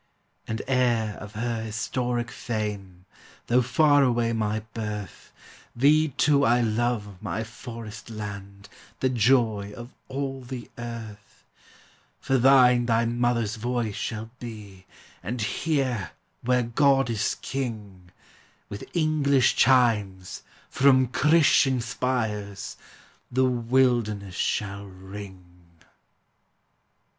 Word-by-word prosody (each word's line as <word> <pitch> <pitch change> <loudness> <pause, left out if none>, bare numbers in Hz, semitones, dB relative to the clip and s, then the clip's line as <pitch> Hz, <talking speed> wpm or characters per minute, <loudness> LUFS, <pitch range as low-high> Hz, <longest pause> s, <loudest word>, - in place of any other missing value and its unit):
And 110 0 -3
heir 120 -5 +1
of 105 0 -10
her 115 +1 -2
historic 120 +2 -2
fame, 100 -6 -5 0.4
Though 125 +2 +3
far 145 +4 +4
away 120 -3 +2
my 110 -1 -1
birth, 105 -4 -6 0.4
Thee, 150 +5 +4
too, 140 0 +2
I 120 0 +4
love, 110 -4 -1
my 110 - -3
Forest 115 -2 -9
land, 100 -2 -8 0.3
The 130 - +1
joy 110 -4 +2
of 120 +2 -10
all 135 0 -4
the 125 -2 -8
earth; 115 -3 -9 0.7
For 135 -1 +1
thine 125 -2 +5
thy 115 0 +2
mother's 120 -2 0
voice 120 -1 -2
shall 110 +2 -5
be, 105 -5 -10 0.3
And 120 +7 -4
here, 130 - -1 0.3
where 125 0 +2
God 135 +2 +3
is 110 -3 0
king, 105 -9 -5 0.6
With 100 - -8
English 145 -5 +3
chimes, 105 -8 +2 0.3
from 130 -2 +4
Christian 145 -3 +4
spires, 110 -5 -3 0.6
The 130 +1 +3
wilderness 120 -5 +1
shall 100 +2 -2
ring. 95 0 -10
115 Hz, 105 wpm, -26 LUFS, 105-125 Hz, 0.7 s, thine